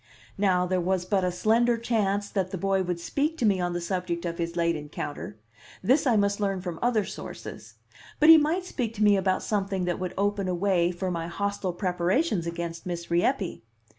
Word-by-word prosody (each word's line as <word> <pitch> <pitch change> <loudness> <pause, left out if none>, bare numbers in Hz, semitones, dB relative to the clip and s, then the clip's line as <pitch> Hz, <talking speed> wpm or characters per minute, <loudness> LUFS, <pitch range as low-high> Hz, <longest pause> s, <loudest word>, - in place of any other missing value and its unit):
Now, 185 -3 +3
there 185 0 0
was 180 0 0
but 195 -1 +1
a 180 - +1
slender 230 +6 +2
chance 205 -4 0
that 190 -3 -1
he 190 - -3
boy 195 +1 +1
would 180 -2 -2
speak 290 - -1
to 240 - 0
me 200 -3 +3
on 175 0 -1
the 175 - -1
subject 175 -1 -3
of 170 0 -4
his 170 0 -2
late 170 -1 +1
encounter; 145 -6 -6 0.5
this 265 +8 +3
I 240 - +4
must 200 -1 +2
learn 195 -2 0
from 175 -3 -5
other 235 -4 +2
sources; - - -9 0.4
but 305 - +5
he 325 0 +10
might 330 +5 0
speak 235 -10 -3
to 215 - 0
me 205 -1 +6
about 190 -1 +1
something 195 -3 -1
that 175 -1 -1
would 185 -1 -4
open 200 -1 0
a 180 - 0
way 175 -2 +2
for 180 +1 -3
my 165 -1 -3
hostile 200 +1 -2
preparations 180 - 0
against 170 0 -5
Miss 170 -1 -5
Rieppe. 185 - 0
190 Hz, 205 wpm, -27 LUFS, 175-210 Hz, 0.5 s, he